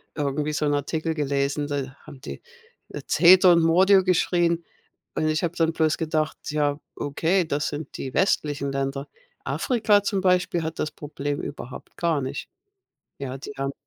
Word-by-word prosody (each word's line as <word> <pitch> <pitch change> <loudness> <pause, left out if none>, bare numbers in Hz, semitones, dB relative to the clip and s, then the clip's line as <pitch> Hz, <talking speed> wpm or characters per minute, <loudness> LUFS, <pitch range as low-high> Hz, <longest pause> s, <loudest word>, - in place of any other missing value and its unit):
irgendwie 150 +1 -1
so 150 - 0
'n 145 - +1
Artikel 155 +3 -1
gelesen. 145 -1 -1
Da 140 -2 -4
haben 140 -3 -12
die, - - -8 0.5
äh, - - -7
Zeter 180 +1 +7
und 170 - +4
Mordio 190 +4 +5
geschrien. 175 -2 +2 0.5
Und 155 - 0
ich 155 +2 0
habe 170 0 -1
dann 165 -1 +2
bloß 160 -1 +1
gedacht: 155 -1 -1
„Ja, 145 -1 0 0.2
okay, 170 +6 0
das 150 0 -1
sind 150 +1 -6
die 130 - -5
westlichen 145 -7 +1
Länder." 135 +1 -3 0.4
Afrika, 215 -5 +2
zum 200 -1 0
Beispiel, 180 -2 +2
hat 160 +1 -5
das 155 - -1
Problem 145 -1 -4
überhaupt 130 -3 -8
gar 165 -4 +1
nicht. 135 +2 -5 0.7
Ja, 135 -1 -5
die 140 - -8
haben 135 0 -2
155 Hz, 165 wpm, -24 LUFS, 140-170 Hz, 0.7 s, Zeter